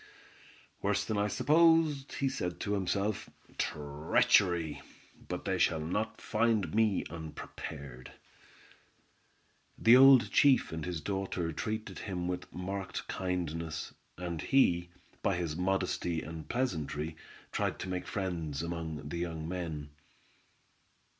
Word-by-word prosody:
"Worse 105 Hz, +1 st, +1 dB
than 110 Hz, -2 st, -1 dB
I 105 Hz, -, +2 dB
supposed," 155 Hz, +1 st, +4 dB
he 140 Hz, -, 0 dB
said 90 Hz, -9 st, -3 dB
to 100 Hz, -, -1 dB
himself; 100 Hz, +1 st, -1 dB, 0.3 s
"treachery! 75 Hz, +3 st, +2 dB, 0.5 s
but -, -, -4 dB
they -, -, 0 dB
shall 80 Hz, -, +3 dB
not 90 Hz, +8 st, -2 dB
find 110 Hz, -2 st, +1 dB
me 110 Hz, -3 st, +3 dB
unprepared!" 70 Hz, -5 st, -8 dB, 1.7 s
The 115 Hz, +2 st, +7 dB
old 130 Hz, -5 st, +8 dB
chief 140 Hz, -3 st, +5 dB
and 80 Hz, -1 st, -4 dB
his 90 Hz, -3 st, -3 dB
daughter 95 Hz, -2 st, -2 dB
treated 110 Hz, +6 st, -4 dB
him 90 Hz, -4 st, -3 dB
with 90 Hz, 0 st, -4 dB
marked 95 Hz, +1 st, -4 dB
kindness, 85 Hz, -4 st, -3 dB, 0.2 s
and 85 Hz, -2 st, -4 dB
he, 85 Hz, -10 st, +3 dB, 0.3 s
by 95 Hz, -, +1 dB
his 85 Hz, -3 st, -2 dB
modesty 90 Hz, -2 st, 0 dB
and 80 Hz, 0 st, -8 dB
pleasantry, 80 Hz, -, -2 dB, 0.4 s
tried -, -, -1 dB
to -, -, -4 dB
make 90 Hz, -1 st, -3 dB
friends 85 Hz, -7 st, -3 dB
among 80 Hz, -3 st, -4 dB
the 85 Hz, -, -4 dB
young 80 Hz, -2 st, -3 dB
men. 80 Hz, -5 st, -4 dB
90 Hz, 120 wpm, -32 LUFS, 80-105 Hz, 1.7 s, old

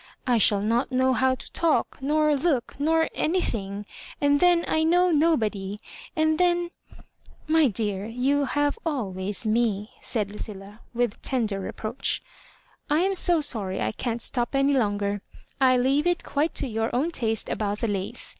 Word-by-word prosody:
" -, -, -42 dB
I -, -, +3 dB
shall 205 Hz, -1 st, +4 dB
not 230 Hz, +5 st, 0 dB
know 260 Hz, 0 st, +2 dB
how 260 Hz, 0 st, +2 dB
to -, -, -12 dB
talk, 330 Hz, -2 st, +1 dB
nor 300 Hz, +2 st, +2 dB
look, 275 Hz, -4 st, 0 dB
nor 320 Hz, +2 st, +2 dB
anything; 210 Hz, -, -1 dB, 0.3 s
and 285 Hz, 0 st, +3 dB
tiien 350 Hz, -1 st, +4 dB
I 315 Hz, -, +1 dB
know 355 Hz, +2 st, +3 dB
nobody; 220 Hz, -11 st, +1 dB, 0.4 s
and 315 Hz, 0 st, +2 dB
then 350 Hz, -1 st, +2 dB, 0.3 s
'* -, -, -28 dB
"My 320 Hz, -3 st, +6 dB
dear, 205 Hz, -2 st, -2 dB
you 270 Hz, +5 st, +1 dB
have 290 Hz, -, 0 dB
always 205 Hz, -, -2 dB
ww," 215 Hz, -2 st, 0 dB
said 210 Hz, -4 st, -1 dB
Lucilla, 205 Hz, 0 st, -8 dB, 0.2 s
with 240 Hz, -3 st, -1 dB
tender 220 Hz, -7 st, -1 dB
reproach. 215 Hz, +5 st, -3 dB, 0.3 s
" -, -, -35 dB
I 300 Hz, +3 st, +3 dB
am 390 Hz, +2 st, +1 dB
so 350 Hz, -3 st, +1 dB
sorry 210 Hz, -10 st, -2 dB
I 110 Hz, -, 0 dB
can't 235 Hz, -, -3 dB
stop 240 Hz, +2 st, -1 dB
any 275 Hz, +1 st, +3 dB
longer. 205 Hz, -5 st, 0 dB, 0.4 s
I 255 Hz, -1 st, +5 dB
leave 275 Hz, +6 st, +2 dB
it 350 Hz, -1 st, 0 dB
quite 295 Hz, +3 st, -1 dB
to -, -, +1 dB
your 225 Hz, -1 st, -1 dB
own 295 Hz, +7 st, +1 dB
taste 225 Hz, -7 st, -1 dB
about 205 Hz, -1 st, -2 dB
the 230 Hz, -, +1 dB
lace. 195 Hz, -2 st, -3 dB
255 Hz, 170 wpm, -25 LUFS, 210-305 Hz, 0.4 s, My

